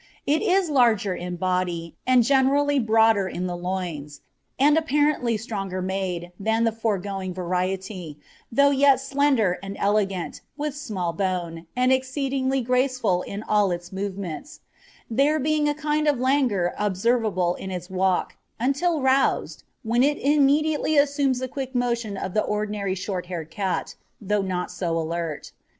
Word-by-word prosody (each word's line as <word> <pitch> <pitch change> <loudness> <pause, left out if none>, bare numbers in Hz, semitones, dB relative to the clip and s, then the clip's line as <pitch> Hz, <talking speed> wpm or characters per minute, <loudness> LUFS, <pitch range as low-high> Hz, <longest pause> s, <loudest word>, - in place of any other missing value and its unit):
It 300 +2 +2
is 385 -3 +2
larger 225 -8 +3
in 180 0 -5
body, 175 -2 -2
and 255 -2 +5
generally 280 +3 +3
broader 220 -3 +3
in 180 0 -4
the 175 -1 -3
loins, 175 -5 -4 0.4
and 290 +3 +5
apparently 295 -6 +1
stronger 195 -4 -4
made, 185 -2 -3
than 220 +3 +1
the 230 - +3
foregoing 195 -4 -3
variety, 185 -2 -3 0.3
though 280 +4 +4
yet 275 -1 +5
slender 270 -8 +1
and 195 0 -7
elegant, 200 -3 0 0.2
with 295 -1 -3
small 200 - -3
bone, 170 -2 -3
and 255 +1 +3
exceedingly 265 0 0
graceful 250 -6 +1
in 200 +3 -6
all 210 -2 +2
its 175 0 -4
movements, 200 - -5 0.5
there 280 +6 +2
being 300 +1 +1
a 295 - -1
kind 300 0 0
of 285 -4 +2
languor 250 -9 +1
observable 205 -3 +1
in 190 - -7
its 180 -1 -5
walk, 185 0 0 0.2
until 280 +6 +1
roused, 265 +1 +1 0.2
when 235 +2 +1
it 290 +2 +3
immediately 295 +2 +2
assumes 285 -2 +2
the 260 +1 -3
quick 265 0 -6
motion 235 -4 -1
of 190 - -4
the 215 - +2
ordinary 210 -2 -2
short 185 -1 -4
haired 165 -3 -6
cat, 190 -1 -2 0.3
though 210 0 0
not 185 -2 -3
so 170 -3 -2
alert. 165 -1 -4
215 Hz, 145 wpm, -24 LUFS, 185-270 Hz, 0.5 s, and